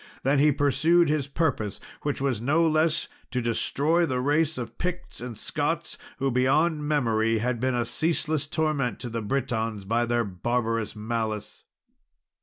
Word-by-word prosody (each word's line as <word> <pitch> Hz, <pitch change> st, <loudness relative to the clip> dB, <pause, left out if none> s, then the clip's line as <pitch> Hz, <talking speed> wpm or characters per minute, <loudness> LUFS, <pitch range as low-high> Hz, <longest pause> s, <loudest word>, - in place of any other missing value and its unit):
Then 135 Hz, +2 st, +3 dB
he 150 Hz, +1 st, +5 dB
pursued 155 Hz, +4 st, +3 dB
his 150 Hz, -2 st, 0 dB
purpose, 140 Hz, -, -1 dB, 0.2 s
which 145 Hz, -1 st, -2 dB
was 130 Hz, -5 st, 0 dB
no 155 Hz, +7 st, +3 dB
less 160 Hz, +1 st, +2 dB, 0.2 s
to 125 Hz, -, -1 dB
destroy 145 Hz, +8 st, +1 dB
the 130 Hz, -6 st, 0 dB
race 150 Hz, +4 st, +1 dB
of 125 Hz, -, -6 dB
Picts 180 Hz, -4 st, -4 dB
and 120 Hz, -3 st, -6 dB
Scots, -, -, -2 dB, 0.2 s
who, 135 Hz, 0 st, 0 dB
beyond 150 Hz, +5 st, +2 dB
memory, 115 Hz, -6 st, +2 dB
had 120 Hz, +1 st, -1 dB
been 130 Hz, +1 st, 0 dB
a 120 Hz, -1 st, 0 dB
ceaseless 155 Hz, +2 st, 0 dB
torment 150 Hz, -7 st, 0 dB
to 125 Hz, -, -4 dB
the 115 Hz, 0 st, -3 dB
Britons 110 Hz, -3 st, -2 dB
by 120 Hz, +3 st, +1 dB
their 120 Hz, 0 st, +1 dB
barbarous 115 Hz, +3 st, -1 dB
malice. 110 Hz, -1 st, -4 dB
130 Hz, 155 wpm, -26 LUFS, 115-155 Hz, 0.2 s, he